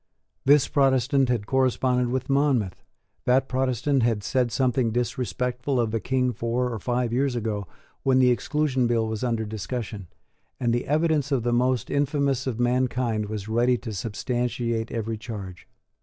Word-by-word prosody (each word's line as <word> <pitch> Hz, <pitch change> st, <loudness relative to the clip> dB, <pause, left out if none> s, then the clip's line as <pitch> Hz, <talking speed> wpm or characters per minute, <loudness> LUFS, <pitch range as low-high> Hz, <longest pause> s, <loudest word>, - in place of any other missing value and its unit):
This 145 Hz, 0 st, +5 dB
Protestant 135 Hz, -1 st, +2 dB
had 120 Hz, -5 st, 0 dB
corresponded 130 Hz, 0 st, +1 dB
with 130 Hz, +1 st, -2 dB
Monmouth: 135 Hz, -9 st, +1 dB, 0.4 s
that 130 Hz, +2 st, +3 dB
Protestant 130 Hz, +1 st, +1 dB
had 115 Hz, -3 st, +1 dB
said 125 Hz, +2 st, 0 dB
something 125 Hz, +2 st, +1 dB
disrespectful 125 Hz, +2 st, -1 dB
of 115 Hz, -2 st, +1 dB
the 115 Hz, -, 0 dB
King 125 Hz, +1 st, 0 dB
four 120 Hz, +2 st, -1 dB
or 110 Hz, -, -4 dB
five 120 Hz, +2 st, -1 dB
years 130 Hz, 0 st, +1 dB
ago, 105 Hz, -4 st, -2 dB, 0.3 s
when 130 Hz, -1 st, +3 dB
the 125 Hz, -1 st, +5 dB
Exclusion 130 Hz, +2 st, 0 dB
Bill 115 Hz, -1 st, +1 dB
was 110 Hz, +1 st, -3 dB
under 115 Hz, -3 st, 0 dB
discussion; 110 Hz, -2 st, -5 dB, 0.5 s
and 120 Hz, -2 st, +1 dB
the 120 Hz, -, -1 dB
evidence 155 Hz, -1 st, +1 dB
of 130 Hz, -4 st, +1 dB
the 120 Hz, 0 st, +1 dB
most 125 Hz, -1 st, +1 dB
infamous 140 Hz, -2 st, 0 dB
of 120 Hz, -3 st, -2 dB
mankind 120 Hz, -3 st, 0 dB
was 105 Hz, -2 st, -5 dB
ready 120 Hz, +3 st, +2 dB
to 115 Hz, -2 st, -7 dB
substantiate 115 Hz, +2 st, -2 dB
every 115 Hz, -1 st, -3 dB
charge. 100 Hz, -6 st, -8 dB
125 Hz, 155 wpm, -25 LUFS, 115-130 Hz, 0.5 s, This